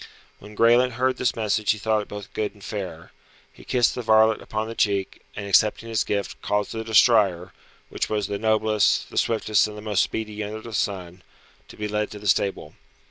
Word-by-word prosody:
When 105 +1 -13
Graelent 120 +3 +4
heard 130 +2 0
this 125 - 0
message 110 -1 -1
he 110 - +3
thought 110 0 0
it 105 - -9
both 105 -1 -9
good 105 -1 -2
and 100 - -17
fair. 90 -6 -6 0.4
He - - -16
kissed 120 -2 +2
the 125 - -4
varlet 110 -1 +4
upon 110 +1 -4
the 115 - -6
cheek, 100 -4 -1
and 105 - -5
accepting 105 +3 +2
his 110 -1 +1
gift, 100 -1 -3
caused 105 0 -1
the 110 0 -4
destrier 105 -5 +3 0.4
which - - -3
was 105 -2 -1
the 100 +1 -4
noblest, 110 -1 +1
the - - -8
swiftest 110 -2 +2
and 105 0 -9
the - - -8
most 105 -3 +1
speedy 110 -1 -3
under 110 +1 -6
the 115 0 -10
sun 90 -4 -3 0.5
to - - -14
be 105 - -3
led 105 0 -2
to 105 - -9
the 105 0 -7
stable. 95 -5 0
105 Hz, 205 wpm, -24 LUFS, 100-110 Hz, 0.5 s, Graelent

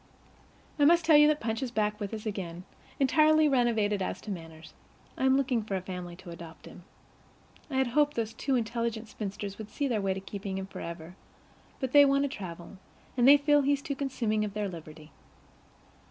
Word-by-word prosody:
I 290 - +5
must 340 +2 +5
tell 320 -1 +6
you 295 0 +8
that 305 0 +2
Punch 225 +2 -2
is 260 - -2
back 210 -2 -1
with 205 -2 -4
us 220 -1 -6
again, 180 -5 -5 0.4
entirely 310 +3 +4
renovated 225 -7 +1
as - - -3
to 210 - -6
manners. 165 -3 -9 0.4
I - - -1
am 265 0 +5
looking 260 -4 +1
for 210 -2 -4
a 190 - -2
family 180 -2 -6
to 175 0 -11
adopt 170 -1 -11
him. - - -13 0.8
I 270 - -5
had 265 0 +3
hoped 290 +4 +1
those 225 -1 -2
two 270 - -1
intelligent 230 -1 -2
spinsters 205 -1 -6
would 215 -1 -7
see 285 - -2
their 225 -5 0
way 195 -1 0
to - - -4
keeping 195 0 -6
him 190 - -4
forever, 170 -2 -8 0.6
but 260 -2 -3
they 290 +1 +8
want 275 0 +3
to 285 - 0
travel, 180 -4 -8 0.4
and 245 -1 +4
they 285 +1 +9
feel 290 0 +3
he's 280 0 +1
too 285 - -3
consuming 245 -6 -1
of 210 -1 -5
their 210 -1 -1
liberty. 155 -3 -10
220 Hz, 200 wpm, -29 LUFS, 190-275 Hz, 0.8 s, they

